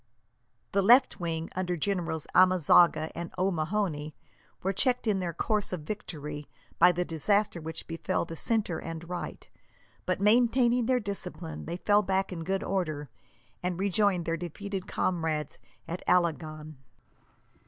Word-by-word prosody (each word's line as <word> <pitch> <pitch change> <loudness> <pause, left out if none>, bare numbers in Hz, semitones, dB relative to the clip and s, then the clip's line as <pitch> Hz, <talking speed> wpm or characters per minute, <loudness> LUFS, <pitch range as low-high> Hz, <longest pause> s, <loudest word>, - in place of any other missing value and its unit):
The 200 - +2
left 245 +6 +5
wing, 165 -1 -3
under 180 -1 -1
Generals 165 -3 -1
Amezaga 180 -3 +5
and 170 0 -6
O'Mahony, 170 -3 -1 0.5
were 195 +1 0
checked 250 +5 +1
in 210 -3 +1
their 175 -2 -2
course 210 +5 -1
of 180 -4 -3
victory 150 -5 -6 0.3
by 180 +2 +8
the 175 +1 -1
disaster 180 +3 +1
which 160 +1 -5
befell 170 +2 -2
the 165 - -7
centre 210 -2 0
and 165 0 -7
right; 180 0 -6 0.6
but, 185 - 0
maintaining 235 +3 +3
their 255 -1 +3
discipline, 180 -6 -5
they 170 +2 -4
fell 205 +2 +3
back 190 -1 -1
in 165 -2 -5
good 190 +3 -1
order, 155 -7 -2 0.5
and 180 -1 -2
rejoined 195 -2 +1
their 165 0 -1
defeated 190 +3 -5
comrades 160 -5 -1 0.3
at 170 +2 -5
Alagon. 155 -3 0
180 Hz, 140 wpm, -29 LUFS, 160-200 Hz, 0.6 s, by